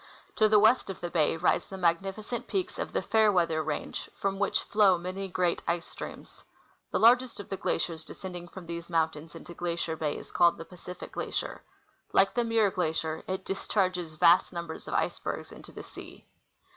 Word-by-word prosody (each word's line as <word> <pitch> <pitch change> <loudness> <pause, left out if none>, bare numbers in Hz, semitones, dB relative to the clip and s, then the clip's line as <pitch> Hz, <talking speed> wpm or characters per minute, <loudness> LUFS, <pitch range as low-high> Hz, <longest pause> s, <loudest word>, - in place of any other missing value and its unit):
To 215 -1 +5
the 215 - +6
west 220 +2 +5
of 195 - -5
the 175 -1 -4
bay 160 -1 +2
rise 175 - +2
the 190 - -7
magnificent 195 +6 -1
peaks 380 -2 -2
of - - -3
the - - -1
Fairweather 180 -8 +3
range, 155 -1 -4
from 195 0 -2
which 205 - +1
flow 200 -4 +4
many 185 +3 -4
great 180 -2 0
ice 170 0 0
streams. - - -9 0.5
The - - 0
largest 245 +1 +5
of 205 - -8
the 195 - -2
glaciers 165 -3 -1
descending 175 +1 -8
from 185 0 -10
these 170 0 -6
mountains 160 -2 -1
into 170 - -10
Glacier 170 -1 -2
bay 155 -2 -2
is - - -10
called 170 -1 +4
the 165 - -8
Pacific 180 0 -10
glacier. - - -3 0.5
Like - - +4
the 240 - +1
Muir 225 -3 +3
glacier, 160 -3 -1
it 190 0 -3
discharges 185 -4 -1
vast 170 +3 +5
numbers 170 -2 -6
of - - -3
icebergs - - -2
into - - -12
the - - -9
sea. - - -12
180 Hz, 185 wpm, -29 LUFS, 170-200 Hz, 0.5 s, the